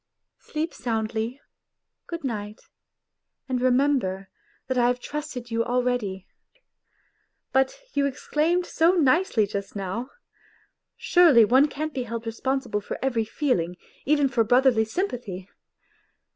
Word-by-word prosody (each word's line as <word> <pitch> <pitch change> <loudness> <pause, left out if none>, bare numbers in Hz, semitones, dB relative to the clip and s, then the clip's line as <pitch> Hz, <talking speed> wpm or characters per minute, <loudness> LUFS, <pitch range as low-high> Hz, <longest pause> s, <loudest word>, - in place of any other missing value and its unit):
" - - -58
Sleep 315 +2 -2
soundly. 225 +1 -2 0.7
Good 335 -2 -6
night, 210 -5 -4 0.9
and 255 -2 -1
remember 250 -7 +1 0.4
that 260 -1 -1
I 240 - +4
have 245 0 +1
trusted 270 -4 -6
you 230 0 +1
already. 245 -7 -1 1.3
But 265 0 +2
you 280 0 +2
exclaimed 315 +6 0
so 335 +1 +3
nicely 315 - +3
just 200 0 -5
now, 200 +6 -4 0.5
' - - -39
Surely 320 - +6
one 260 +6 +5
can't 305 +2 -4
be 255 -3 -3
held 230 0 -5
responsible 235 -1 -2
for - - -5
every 235 -4 +1
feeling, 215 - -1 0.3
even 290 0 +3
for 240 -3 +2
brotherly 245 0 +4
sympathy 220 - -4
250 Hz, 125 wpm, -25 LUFS, 220-280 Hz, 1.3 s, Surely